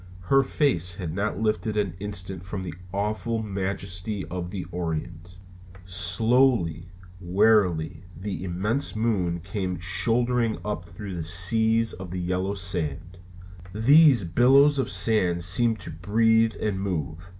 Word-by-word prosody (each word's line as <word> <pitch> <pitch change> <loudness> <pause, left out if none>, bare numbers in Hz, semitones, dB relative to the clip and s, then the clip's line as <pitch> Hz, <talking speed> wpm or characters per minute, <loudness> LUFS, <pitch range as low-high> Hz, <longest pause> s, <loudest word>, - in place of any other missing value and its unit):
Her 135 - +7
face 90 - +1
had 85 -4 -5
not 100 +4 -2
lifted 110 0 -1
an 100 -5 0
instant 95 -3 -4
from 95 +1 -5
the 90 -4 -6 0.2
awful 110 +3 -2
majesty 95 0 -3
of 90 -1 -4
the 95 -1 -5
Orient. 85 +1 -5 0.5
Slowly, 95 0 +1 0.3
wearily, 90 -3 +2
the 95 -1 -5
immense 105 +9 -2
moon 95 -7 0
came 90 0 -3
shouldering 115 +6 +1
up 105 -5 -3
through 95 +2 -8
the 85 - -4
seas 110 +7 +2
of 95 -1 -8
yellow 90 +2 -2
sand. 90 -2 -3 0.6
These 140 - +6
billows 135 - +4
of 130 - -1
sand 95 -3 +1
seemed 110 +6 +2
to - - -7
breathe 115 +6 +2
and 100 -3 -2
move. 90 -2 -4
95 Hz, 130 wpm, -25 LUFS, 90-110 Hz, 0.6 s, Her